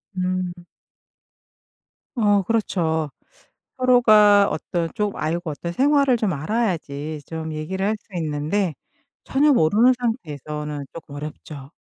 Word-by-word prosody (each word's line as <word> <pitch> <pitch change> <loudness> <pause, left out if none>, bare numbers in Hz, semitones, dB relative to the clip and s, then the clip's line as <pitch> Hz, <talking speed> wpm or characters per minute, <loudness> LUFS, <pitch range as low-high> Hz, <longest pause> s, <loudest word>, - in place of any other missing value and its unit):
음. 185 -1 -1 1.6
어 205 -4 +3
그렇죠. 170 -7 0 0.7
서로가 215 -5 +6
어떤 170 -3 -2
좀 210 -1 -1
알고 165 +2 -2
어떤 170 +4 -5
생활을 275 +2 +3
좀 215 -5 0
알아야지 155 -4 -2
좀 160 -1 -5
얘기를 190 +6 -3
할 215 - +1
수 - - -37
있는데 155 +4 -1 0.5
전혀 290 +2 +3
모르는 225 +6 +4
상태에서는 150 - -4
쪼끔 155 -3 -10
어렵죠. 145 -1 -8
180 Hz, 240 characters per minute, -22 LUFS, 155-215 Hz, 1.6 s, 서로가